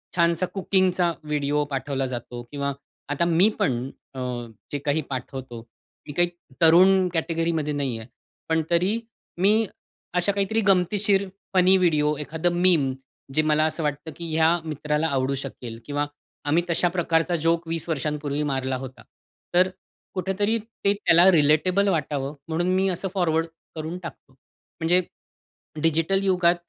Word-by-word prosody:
छानसा 170 +1 +2
कुकिंगचा 185 -2 +2
व्हिडिओ 150 -1 0
पाठवला 135 0 -1
जातो 120 0 -6
किंवा 140 -1 -2 0.4
आता 145 +4 +1
मी 175 +5 +4
पण 125 0 0 0.3
अ, 130 - -5 0.5
जे 145 - -1
काही 145 +2 +2
पाठवतो, 130 -2 -6 0.5
मी 145 - -6
काही 175 0 +4 0.3
तरुण 185 +3 +6
कॅटेगरीमध्ये 165 -2 -1
नाही 135 -5 -1
आहे. 110 - -10 0.4
पण 160 0 +2
तरी 185 +7 +2 0.4
मी 215 +3 +4 0.5
अशा 180 +3 +3
काहीतरी 200 +3 0
गंमतीशीर 195 +1 +3 0.3
फनी 185 0 +5
व्हिडिओ. 150 -4 +2
एखादं 160 +4 -1
मीम, 155 -8 +4 0.4
जे 155 - +3
मला 155 0 +3
असं 160 +1 -2
वाटतं 150 +2 -3
की 170 -1 -6
या 160 0 +5 0.2
मित्राला 150 +1 -1
आवडू 135 -1 0
शकेल 115 -4 -7
किंवा 145 0 -1 0.4
आम्ही 170 +3 +3
तशा 170 +1 +2
प्रकारचा 170 0 +1
जोक 165 0 +2
20 165 0 -3
वर्षांपूर्वी 150 -1 -2
मारला 130 -1 -1
होता. 130 0 -9 0.5
तर 185 +1 +6
अ, 185 - -8 0.4
कुठेतरी 200 +4 0
ते 210 -2 -1
त्याला 180 -3 +5
रिलेटेबल 165 +6 +3
वाटावं 145 -4 -1
म्हणून 165 +2 -1
मी 190 +1 +2
असं 185 +1 -2
फॉरवर्ड 165 -3 +1 0.3
करून 160 +3 -4
टाकतो. 140 -4 -10
म्हणजे 165 +6 -2 0.8
डिजिटल 165 +5 +2
युगात 180 -2 +3
165 Hz, 140 wpm, -24 LUFS, 145-185 Hz, 0.8 s, तरुण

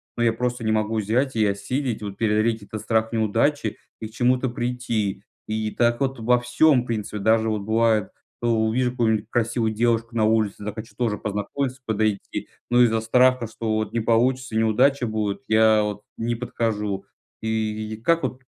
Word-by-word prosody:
но 120 - 0
я 115 -1 +3
просто 125 +1 -2
не 110 - +1
могу 110 0 0
взять 115 +5 0
и 110 - +3
осилить, 110 +5 -2
вот 100 -2 -6
преодолеть 110 0 +1
этот 110 +1 -7
страх 110 +1 0
неудачи 115 +3 +1 0.2
и 110 - -4
к - - -16
чему-то 125 +2 +1
прийти. 120 -5 -2 0.2
И 110 0 -2
так 120 0 +2
вот 135 -2 -1
во 120 +2 +3
всём, 125 +3 +3
в 120 - -8
принципе, 105 -2 -3
даже 110 +2 +3
вот 110 -1 -1
бывает, 110 -1 +2 0.3
у 120 - 0 0.2
увижу 125 +2 +1
какую-нибудь 110 -4 +1
красивую 115 -1 0
девушку 115 +1 0
на 110 - +2
улице, 110 -2 +1
захочу 110 +2 -6
тоже 115 -4 -1
познакомиться, 125 +6 -3
подойти, 110 -2 -1 0.2
но 120 0 +5
из-за 115 -2 +2
страха, 125 +1 +3
что 110 0 -3
вот 110 0 -2
не 115 - +1
получится, 120 +2 +1
неудача 120 +4 +3
будет, 110 0 -2
я 110 0 +5
вот 105 0 -4 0.2
не 120 +1 -1
подхожу. 110 -4 -2 0.4
И 110 -1 -2
как 170 +2 +3
вот 130 - -3
110 Hz, 175 wpm, -23 LUFS, 110-120 Hz, 0.4 s, но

